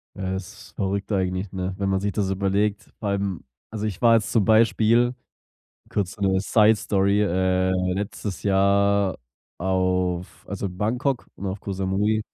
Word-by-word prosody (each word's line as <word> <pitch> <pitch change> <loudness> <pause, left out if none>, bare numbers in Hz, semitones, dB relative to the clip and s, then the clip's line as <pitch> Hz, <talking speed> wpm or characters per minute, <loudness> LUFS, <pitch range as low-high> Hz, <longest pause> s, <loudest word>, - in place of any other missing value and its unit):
Ja, 95 -2 -3
das 95 +1 -3 0.3
ist - - -21
verrückt 100 +2 -2
eigentlich, 95 0 -1
ne, 95 0 -3
wenn 100 -1 -1
man 95 0 +1
sich 100 +1 -1
das 100 0 -1
überlegt 100 +2 0
beim 100 -3 -2 0.3
also, 110 -1 -3
ich 105 -5 -4
war 115 -1 +6
jetzt 110 -3 0
zum 110 -4 +3
Beispiel- 115 +2 +4 0.8
kurz 100 -3 -2
so - - -17
'ne 95 -1 +2
Side 105 +2 +4
Story- 100 -1 +1
äh, 95 -1 +1 0.2
letztes 100 0 -4
Jahr 100 0 +2 0.4
auf 90 -1 -1
also, 100 0 -3
Bangkok 120 +8 -1
und 100 - -6
auf 95 +1 -4
Ko 100 - -5
Samui. 95 +3 0
100 Hz, 160 wpm, -24 LUFS, 95-105 Hz, 0.8 s, war